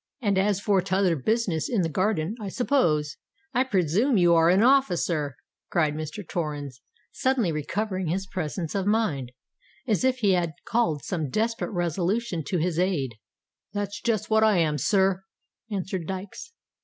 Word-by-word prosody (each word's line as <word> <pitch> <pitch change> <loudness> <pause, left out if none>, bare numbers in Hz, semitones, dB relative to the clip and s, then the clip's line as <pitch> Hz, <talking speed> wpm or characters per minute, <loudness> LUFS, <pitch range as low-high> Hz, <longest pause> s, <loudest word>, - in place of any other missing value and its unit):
And 205 -5 +1
as 200 0 +2
for 200 -2 +2
t'other 190 -1 +1
business 180 - 0
in 220 -7 +1
the - - +1
garden—I 200 +3 -1
s'pose——" 175 - +1 0.4
"I 250 - +3
presume 210 - +2
you 175 -2 +5
are 165 0 +5
an 190 +4 +4
officer?" 175 - +2 0.3
cried 155 -4 +1
Mr. 155 +5 -6
Torrens, 145 -6 -4 0.3
suddenly 255 -9 +1
recovering 185 +5 -2
his 190 +4 -1
presence 175 -2 -4
of 195 -1 -1
mind, 170 - 0 0.5
as 220 -2 +1
if 260 0 +2
he 210 -6 +2
had 175 -3 +1
called 170 - 0
some 160 -6 -2
desperate 225 - -1
resolution 175 +2 -1
to 180 - 0
his 170 0 0
aid. 165 -10 0 0.6
"That's 205 0 -3
just 215 -2 0
what 220 0 +4
I 215 -3 +4
am, 155 -3 +1
sir," 190 - +2 0.5
answered 190 -4 -3
Dykes. 190 - -6
185 Hz, 155 wpm, -26 LUFS, 160-215 Hz, 0.6 s, you